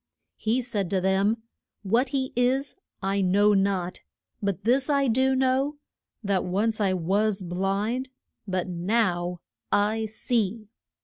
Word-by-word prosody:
He 235 +4 0
said 205 -6 -2
to 190 - +1
them, 195 +4 +1 0.4
What 235 +7 +2
he 265 -1 -2
is 255 +3 +1 0.3
I 195 +1 +1
know 200 +3 +4
not; 195 -2 0 0.4
but 200 -1 -2
this 260 +6 +2
I 280 -2 +3
do 260 +3 +3
know, 265 +3 +1 0.5
that 200 -2 +1
once 215 +4 0
I 195 -2 +2
was 195 +3 0
blind, 195 +8 -1 0.4
but 185 -1 -1
now 180 -1 0 0.3
I 215 +2 +2
see. 220 -1 -1
210 Hz, 130 wpm, -26 LUFS, 190-245 Hz, 0.5 s, know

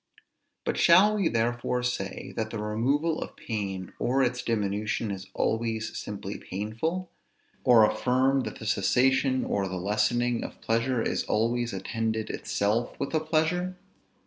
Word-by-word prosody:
But - - -1
shall 190 +5 +6
we 200 -5 +2
therefore 120 +2 0
say, 100 -6 -3
that 110 -1 -2
the 115 - -5
removal 130 +10 0
of - - -6
pain 95 -5 -4
or 135 +2 +2
its 125 0 0
diminution 105 0 -1
is 95 -1 -6
always 110 0 -1
simply 100 -1 -5
painful? 115 - -3 0.5
or 115 -3 +7
affirm 130 +4 +2
that 130 - -4
the - - -9
cessation 130 0 +2
or 100 -1 0
the 95 - -4
lessening 110 +5 +1
of - - -8
pleasure 115 +1 0
is - - 0
always 115 +2 0
attended 110 +3 -2
itself 110 +4 -1
with 140 - -3
a 160 - +3
pleasure? 165 +4 0
115 Hz, 145 wpm, -28 LUFS, 105-130 Hz, 0.5 s, or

